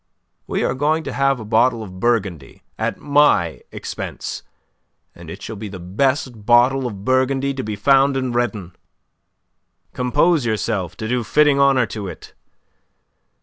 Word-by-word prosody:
We - - -1
are - - +1
going 155 +4 0
to - - -5
have 135 -1 +1
a 110 - -7
bottle 115 +1 +2
of 95 -3 -10
Burgundy 95 - -2 0.2
at - - -1
my 145 - +2
expense, - - -6 0.7
and - - -12
it - - -9
shall 110 - -6
be 105 +1 -7
the 95 - -8
best 120 - -1
bottle 125 +3 +4
of 100 -4 -8
Burgundy 130 +1 +1
to 135 - -4
be 105 0 -4
found 135 +5 +3
in 130 -1 -2
Redon. 105 -7 -2 1.2
Compose 145 +5 +2
yourself 110 -5 -2
to 110 - -4
do 120 +1 0
fitting 150 +3 +3
honour 135 -3 +4
to 105 -3 -6
it. - - -10
120 Hz, 150 wpm, -20 LUFS, 105-135 Hz, 1.2 s, bottle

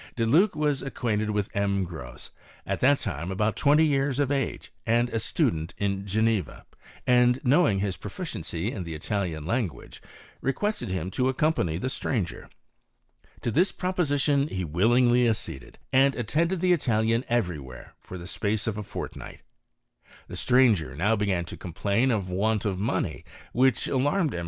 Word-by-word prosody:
De 115 - 0
Luc 175 - +4
was 150 -2 0
acquainted 110 -5 -2
with 105 -1 -2
M. 100 -1 +1
Gros 70 -9 -8 0.3
at - - -2
that 140 +2 +4
time 100 -7 -4
about 105 +2 0
twenty 150 +6 +4
years 140 -2 +1
of 145 -1 +1
age, 140 -1 -2
and 120 +2 +2
a 115 - -2
studen 80 -6 0
in 100 -1 -2
Geneva, 110 -3 0 0.4
and 125 0 +4
knowing 130 - +4
his 95 -1 -1
proficiency 85 +7 -4
in 95 - -5
the 85 -2 -6
Italiai 90 -2 -2
language, 100 - -3 0.4
requested 205 - -1
him 90 0 -3
to 130 +4 +1
accompany 130 - +1
the 110 - -4
strangei 115 -7 -3 0.9
To 120 - -1
this 175 - +3
proposition 145 -6 +1
he 95 -9 -3
willingly 120 +9 +3
acceded, 65 - -4 0.2
and 135 +1 +5
attende 165 - 0
the 180 +1 +3
Italian 115 -5 +1
every 95 -10 0
where 65 -2 -11
for 90 - -9
the 85 - -9
space 105 +3 -1
of 110 -2 -2
a - - -4
fortnigh - - -7 0.9
The - - -8
stranger 110 - +3
now 100 +9 +2
began 100 -5 0
to - - -8
complain 100 +8 0
of 105 -6 0
wantof 100 +1 0
mone; 95 -6 -1 0.3
which 130 +1 +2
alarmed 145 +5 +1
M. - - -3
110 Hz, 155 wpm, -26 LUFS, 95-135 Hz, 0.9 s, and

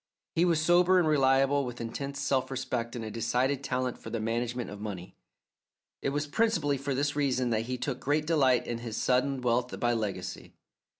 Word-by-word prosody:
He 170 - +3
was 170 -3 +3
sober 175 +3 +4
and 175 -3 +3
reliable, 135 -1 +3
with 125 -2 -6
intense 140 +4 -5
self 135 -2 0
respect 125 -3 -3
and 115 -2 -4
a 110 - -5
decided 130 +5 0
talent 125 -1 -2
for - - -8
the 115 - -3
management 120 +2 -2
of 105 0 -8
money. 95 -4 -6 0.9
It - - 0
was 145 +1 -1
principally 150 - +1
for 140 0 -2
this 145 +2 0
reason 130 -4 +1
that 115 +1 0
he 130 0 -2
took 125 0 -3
great 150 +3 0
delight 135 -6 +3
in 120 -1 -3
his 115 -2 -5
sudden 130 +1 +1
wealth 125 +1 0
by 120 0 +2
legacy. 100 -5 -4
130 Hz, 190 wpm, -29 LUFS, 120-145 Hz, 0.9 s, sober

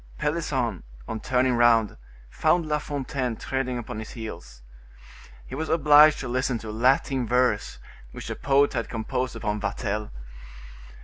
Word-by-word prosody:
Pelisson, 135 - -1 0.3
on 110 - -4
turning 125 +1 +1
round, 120 -2 +4 0.3
found 170 - +1
La 150 -1 0
Fontaine 135 -4 -3
treading 130 +1 -3
upon 110 -2 -6
his 110 - -8
heels. - - -9 0.8
He - - -11
was 160 +4 -3
obliged 150 -1 +6
to 130 - -5
listen 125 0 0
to 110 -1 -8
a - - -4
Latin 125 +2 +1
verse, 125 -3 +1 0.3
which - - -8
the - - -4
poet 140 +1 +2
had - - -3
composed 125 +3 -3
upon 105 -1 -3
Vatel. 105 +1 -3
125 Hz, 145 wpm, -25 LUFS, 110-135 Hz, 0.8 s, obliged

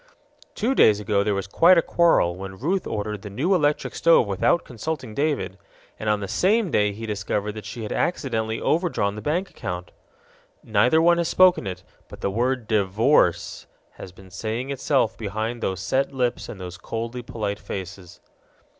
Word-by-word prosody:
Two 235 +5 0
days 105 - +5
ago 105 -1 +1
there 105 -1 0
was 100 - -2
quite 170 - +5
a - - +6
quarrel, 165 - +3
when 95 +1 -8
Ruth 180 - -1
ordered 105 -1 -3
the 105 - -8
new 140 - 0
electric 150 -4 +1
stove 165 -7 +4
without 100 - +1
consulting 130 0 -5
David 140 -8 -1 0.4
and 110 - -2
on 105 -1 +1
the 100 - -4
same 200 - +2
day 105 0 +2
he 110 +3 -7
discovered 105 0 -2
that 105 -1 -9
she 115 +1 -6
had 105 - -5
accidentally 115 -9 -1
overdrawn 160 - 0
the 105 - -7
bank 175 - -1
account! 90 0 -6 0.7
Neither 120 +9 +3
one 170 0 +5
has 170 - 0
spoken 185 - +4
it, 95 - -6 0.2
but - - -12
the 100 - -1
word 120 +2 -1
DIVORCE 100 - +2 0.2
has 90 - -10
been 95 0 -16
saying 115 +8 -4
itself 135 -4 +1
behind 110 +3 -3
those 95 -1 -2
set 135 +8 0
lips 125 -3 -2
and 100 - -8
those 90 0 -7
coldly 115 +3 -5
polite 105 -3 -4
faces. 95 -2 -8
110 Hz, 175 wpm, -24 LUFS, 100-145 Hz, 0.7 s, a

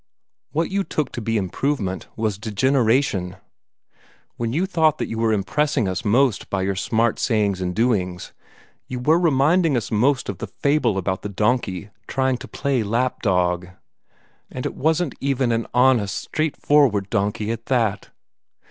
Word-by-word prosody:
What 165 +4 -1
you 195 0 +1
took 155 -6 -2
to 120 - -5
be 115 +1 0
improvement 95 0 -2
was 110 -3 -2
degeneration. 110 -4 +1 1.0
When 115 -1 -2
you 165 +9 +1
thought 160 -5 +2
that - - -2
you 115 - -4
were 115 -1 +2
impressing 110 +5 0
us 95 +2 -3
most 120 +1 +2
by 95 -1 -1
your 95 0 -1
smart 115 +3 0
sayings 105 -5 +1
and 90 -1 -2
doings, 95 -7 0 0.5
you 125 - -5
were 155 +7 +3
reminding 160 -1 +3
us 115 - -4
most 125 +5 +2
of 100 - -5
the - - -4
fable 140 -8 +1
about 95 0 -2
the 105 - -5
donkey 105 -2 -1 0.2
trying 130 -1 0
to - - -10
play 135 -3 -1
lap 115 +4 -1
dog. 90 -3 +1 0.8
And 125 - -6
it - - -2
wasn't 160 +1 0
even 135 -3 0
an 115 0 -1
honest, 125 -6 +3
straightforward 145 -9 +1
donkey 105 +1 -1
at 115 0 -6
that!" 110 -6 0
115 Hz, 155 wpm, -22 LUFS, 100-135 Hz, 1.0 s, were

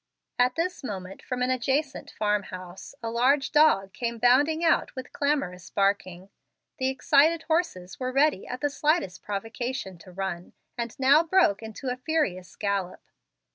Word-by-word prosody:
At 250 +1 +3
this 345 -1 -2
moment 195 -5 -6
from 250 0 -3
an 255 - +1
adjacent 265 +3 -1
farm 210 -1 0
house, 185 +4 -10
a 225 - -2
large 265 +4 +2
dog 195 -11 +4
came 235 +3 -3
bounding 290 +8 +3
out 330 - +2
with 260 -1 -8
clamorous 275 - -1
barking. 195 -2 -1 0.5
The 260 0 +1
excited 290 +5 +3
horses 315 - -2
were 255 -1 -2
ready 275 -5 +2
at 250 0 -6
the 290 - 0
slightest 295 - 0
provocation 220 -1 -4
to 185 - -14
run, 180 -1 -5 0.2
and 235 0 -5
now 275 +4 +6
broke 330 - +3
into 225 +4 -6
a 250 - -3
furious 255 - -2
gallop. 200 -3 -2
245 Hz, 155 wpm, -27 LUFS, 195-285 Hz, 0.5 s, now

